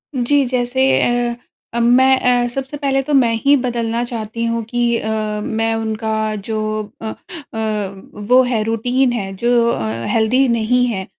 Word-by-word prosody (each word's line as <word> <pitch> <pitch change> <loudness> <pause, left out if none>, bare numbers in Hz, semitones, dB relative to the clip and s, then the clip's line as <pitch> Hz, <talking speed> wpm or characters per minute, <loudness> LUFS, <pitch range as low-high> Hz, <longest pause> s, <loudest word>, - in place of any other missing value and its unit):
जी। 275 +3 +2
जैसे 255 +2 +1
अ 240 0 0 0.4
अ, 235 - -1
मैं 260 +3 +5
अ, 245 -1 +2
सबसे 270 +4 -5
पहले 270 -1 0
तो 295 - -3
मैं 240 -4 +4
ही 285 +1 +6
बदलना 235 -1 -1
चाहती 230 -1 -5
हूँ 230 0 -1
कि 235 0 0
अ, 220 - -4 0.3
मैं 225 0 -1
उनका 220 -1 -2
जो 220 -1 -2 0.4
अ - - -6
अ, - - -4 1.1
वो 255 +1 +6
है 235 -4 0
रूटीन 245 +3 +1
है 195 -4 -4
जो 235 +2 +2
अ, 115 - -2
हेल्दी 240 +4 +3
नहीं 235 +2 +2
है 190 -5 -3
235 Hz, 160 wpm, -18 LUFS, 225-250 Hz, 1.1 s, ही